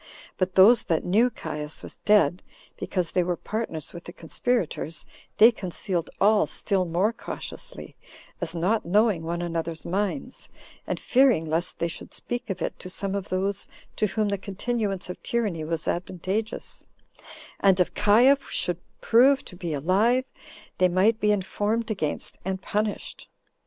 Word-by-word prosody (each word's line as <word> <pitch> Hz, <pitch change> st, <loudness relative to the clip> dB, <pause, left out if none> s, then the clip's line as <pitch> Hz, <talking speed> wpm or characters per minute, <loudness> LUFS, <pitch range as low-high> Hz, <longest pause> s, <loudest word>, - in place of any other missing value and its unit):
But 185 Hz, -1 st, 0 dB
those 210 Hz, +5 st, +7 dB
that 165 Hz, -2 st, 0 dB
knew 220 Hz, +7 st, +4 dB
Caius 150 Hz, -7 st, -5 dB
was -, -, -9 dB
dead, 185 Hz, -5 st, +4 dB, 0.3 s
because 180 Hz, -4 st, -2 dB
they 180 Hz, -, +2 dB
were 175 Hz, 0 st, 0 dB
partners 200 Hz, -7 st, -4 dB
with 170 Hz, -1 st, -9 dB
the -, -, -8 dB
conspirators, 170 Hz, -2 st, -2 dB, 0.3 s
they 225 Hz, +3 st, +8 dB
concealed 185 Hz, -4 st, -3 dB
all 210 Hz, +1 st, +4 dB
still 195 Hz, -3 st, 0 dB
more 180 Hz, +7 st, +1 dB
cautiously, -, -, -8 dB, 0.5 s
as 170 Hz, -1 st, -2 dB
not 190 Hz, +7 st, +1 dB
knowing 205 Hz, 0 st, +3 dB
one 170 Hz, +1 st, -3 dB
another's 165 Hz, -1 st, -3 dB
minds; 205 Hz, +8 st, -3 dB, 0.4 s
and -, -, -2 dB
fearing 255 Hz, -10 st, +3 dB
lest 160 Hz, +2 st, -1 dB
they 170 Hz, -, 0 dB
should 170 Hz, -, -7 dB
speak 245 Hz, -1 st, -4 dB
of 195 Hz, -, -3 dB
it -, -, -4 dB
to 185 Hz, -, -8 dB
some 195 Hz, +1 st, -3 dB
of 200 Hz, -2 st, -3 dB
those 190 Hz, +2 st, -1 dB, 0.3 s
to 215 Hz, -, +2 dB
whom 215 Hz, +1 st, 0 dB
the 200 Hz, -1 st, -1 dB
continuance 200 Hz, 0 st, -2 dB
of 180 Hz, -, -7 dB
tyranny 210 Hz, -9 st, -1 dB
was 160 Hz, 0 st, -3 dB
advantageous; 185 Hz, +5 st, -3 dB, 0.7 s
and 190 Hz, -2 st, +4 dB
if 180 Hz, -, +2 dB
Caius 245 Hz, +7 st, +4 dB
should 175 Hz, -1 st, -1 dB, 0.2 s
prove 265 Hz, +4 st, +5 dB
to 180 Hz, -, -10 dB
be 175 Hz, -2 st, -4 dB
alive, 200 Hz, -, +2 dB, 0.5 s
they 185 Hz, -, +6 dB
might 200 Hz, +5 st, +3 dB
be 210 Hz, -2 st, +3 dB
informed 210 Hz, +3 st, -1 dB
against, 160 Hz, -8 st, -3 dB
and 190 Hz, 0 st, -2 dB
punished. 210 Hz, +2 st, -3 dB
190 Hz, 155 wpm, -26 LUFS, 175-220 Hz, 0.7 s, they